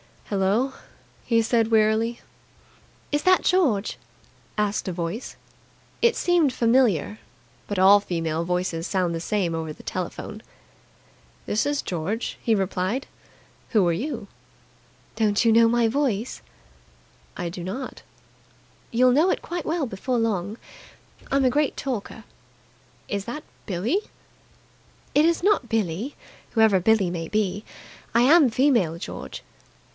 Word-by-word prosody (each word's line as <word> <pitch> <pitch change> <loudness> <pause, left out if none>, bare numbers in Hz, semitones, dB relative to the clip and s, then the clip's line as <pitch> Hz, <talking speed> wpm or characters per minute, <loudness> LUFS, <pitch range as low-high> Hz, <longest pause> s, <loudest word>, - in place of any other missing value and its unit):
"Hello?" 205 +7 +1 0.5
he 230 -1 +3
said 225 0 +1
wearily. 225 +1 +2 0.9
"Is 290 0 +1
that 370 0 +4
George?" 275 - +2 0.6
asked 210 -1 0
a 185 - -2
voice. 170 +8 -4 0.7
It 470 0 +4
seemed 345 -7 +2
familiar, 230 - +2 0.5
but 205 - -3
all 195 +2 +7
female 165 -4 -2
voices 180 -1 -1
sound 185 -3 0
the 165 - -2
same 180 -1 -1
over 160 -1 -3
the - - -15
telephone. 185 +3 -5 1.0
"This 215 - 0
is 290 0 0
George," 185 +7 -3
he 225 - +2
replied. 195 +5 -1 0.6
"Who 210 -6 +4
are - - +3
you?" 235 - -4 0.9
"Don't 210 -1 +2
you 230 - +4
know 230 +1 +6
my 235 0 +3
voice?" 245 -3 -1 1.0
"I 175 -2 -3
do 175 0 -7
not." 235 +9 -6 0.9
"You'll 250 +2 +4
know 305 +8 +4
it - - -1
quite 345 0 -5
well 320 -2 0
before 240 +3 -2
long. 215 -2 -1 0.7
I'm 275 0 +2
a - - +5
great 290 +3 +1
talker." 230 -4 -4 0.9
"Is 200 -1 -2
that 270 +6 -6 0.2
Billie?" 210 - 0 1.1
"It 295 +2 +5
is 335 0 +1
not 395 - +2
Billie, 220 - -1 0.4
whoever 220 -4 +4
Billie 195 -1 +3
may 165 -2 -4
be. 210 0 -1 0.5
I 235 - +6
am 290 +2 +6
female, 230 - +2
George." 170 - -7
220 Hz, 130 wpm, -24 LUFS, 190-255 Hz, 1.1 s, all